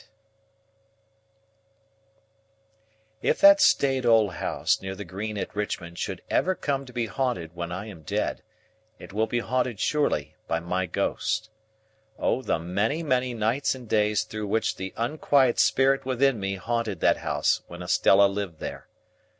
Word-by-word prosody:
If - - +1
that 295 0 +8
staid 135 - +3
old 110 -5 +4
house - - 0
near 95 0 -5
the 100 +1 -7
Green 105 +4 -5
at 100 - -5
Richmond 85 -5 -4
should - - -4
ever 185 +1 +1
come 140 -4 -2
to - - -10
be 120 -1 -1
haunted 115 -10 -2
when 85 0 -5
I 95 +4 -5
am 100 -7 -10
dead, 75 - -2 0.6
it - - -12
will 110 +2 +1
be 120 - -1
haunted, 125 -2 -1
surely, 110 - 0
by 80 - 0
my 90 +2 -2
ghost. 110 +6 -2 0.7
O 130 - 0
the - - 0
many, 100 - -1
many 130 -4 0
nights 115 +6 0
and 125 -3 -11
days 105 0 +2
through 110 -1 -6
which 110 +3 0
the 95 0 -5
unquiet 130 +1 +2
spirit 135 +1 +3
within 130 -1 +1
me 95 0 -2
haunted 115 -1 -2
that - - +4
house 75 +2 0
when 85 +1 -8
Estella 95 +2 +5
lived 100 -4 -2
there! - - -7
110 Hz, 150 wpm, -26 LUFS, 95-130 Hz, 0.7 s, that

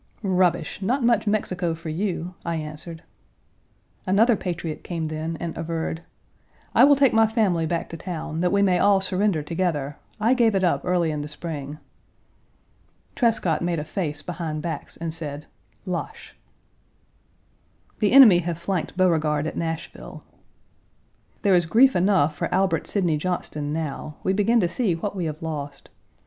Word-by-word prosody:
"Rubbish, 180 -3 +1
not 245 +7 0
much 235 -2 +2
Mexico 185 -5 0
for 165 0 -8
you," 180 +1 -3
I 170 -1 -2
answered. 160 +2 -7 1.0
Another 220 +5 +4
patriot 175 -5 -5
came 165 -2 -3
then 155 +1 -4
and 170 -1 -4
averred, 165 0 -3 0.7
"I - - +7
will 285 0 +6
take 275 -2 +3
my 225 0 +5
family 195 -8 +1
back 170 +1 -2
to 165 - -7
town, 165 -2 -5
that 180 0 +2
we 200 0 +3
may 185 -2 +3
all 200 -1 +4
surrender 190 -3 0
together. 150 -4 -2 0.2
I 225 +4 +3
gave 230 -5 +3
it 190 - +1
up 175 - +2
early 175 -3 +1
in 150 -1 -3
the 145 - -5
spring." 150 -2 -6 1.4
Trescott 215 - +1
made 175 -1 -1
a 150 - -2
face 150 -2 -4
behind 160 -3 -4
backs, 160 -4 -5
and 165 -1 -4
said: 150 -2 -6 0.2
" - - -38
Lache!" 445 - -7 1.6
The 210 - +2
enemy 240 -9 +9
have 170 -1 -3
flanked 175 0 -3
Beauregard 155 -5 +2
at 160 - -4
Nashville. 165 -1 -5 1.2
There 200 -3 +4
is 175 -2 +3
grief 260 +9 +5
enough 180 -5 +3
for - - -3
Albert 195 -1 +1
Sidney 175 -7 +1
Johnston 150 -3 -3
now; 155 -1 -4
we 190 - +1
begin 215 +4 +3
to 175 - +2
see 190 -1 0
what 200 +4 -4
we 180 -3 -2
have 155 0 -5
lost. 145 -3 -6
175 Hz, 160 wpm, -24 LUFS, 160-195 Hz, 1.6 s, enemy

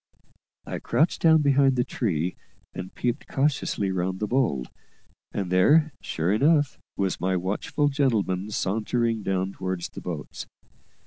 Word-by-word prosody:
I - - -4
crouched 160 +3 +1
down 160 -2 +5
behind 140 -1 +4
the 125 - +2
tree, 90 - -1 0.4
and 95 0 -6
peeped 120 -1 -2
cautiously 135 -8 0
round 95 0 -2
the 105 - 0
bole; 115 - +1 0.7
and 95 -3 -3
there, 150 - +4
sure 85 +5 -1
enough, 145 +4 +3 0.2
was 95 -3 -1
my 95 +1 +1
watchful 100 - -1
gentleman 110 -9 0
sauntering 110 +3 0
down 95 -1 -1
towards 95 -2 -4
the - - -9
boats. - - -6
105 Hz, 135 wpm, -25 LUFS, 95-135 Hz, 0.7 s, down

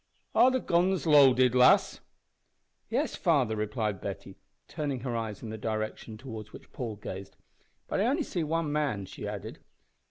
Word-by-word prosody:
"Are 255 - +6
the 260 0 +1
guns 180 -2 +1
loaded, 130 -5 +6
lass?" 125 0 +5 0.9
"Yes, - - -1
father," 110 - +2
replied 105 -2 -2
Betty, 95 -1 -6 0.3
turning 145 -5 -3
her 125 -2 -3
eyes 110 -2 -4
in 115 - -6
the 110 - -6
direction 110 0 -4
towards 110 -4 -8
which - - -13
Paul 115 -4 -4
gazed. 100 -1 -8 0.5
"But - - -1
I 250 - +2
see 190 - -3
only 155 - -3
one 165 -2 0
man," 145 -10 -1
she - - -8
added. - - -6
125 Hz, 160 wpm, -29 LUFS, 110-150 Hz, 0.9 s, Are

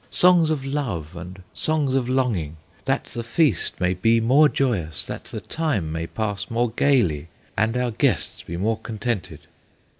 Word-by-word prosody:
Songs 175 -3 +5
of 145 -4 -1
love 105 - -3
and 90 +2 -9
songs 150 -4 +1
of 130 -2 0
longing, 110 - 0 0.3
That - - +1
the 120 - -6
feast 145 +6 +1
may 90 0 +2
be 115 +6 +3
more 135 +7 +5
joyous, 85 - 0
That - - -7
the - - -7
time 140 - -1
may 80 +1 -3
pass 105 -1 -3
more 115 0 0
gayly, 105 - +2 0.3
And 110 +3 +1
our 125 -1 0
guests 110 - 0
be 85 - -6
more 110 +4 0
contented!" 110 -2 -4
115 Hz, 160 wpm, -23 LUFS, 90-135 Hz, 0.3 s, Songs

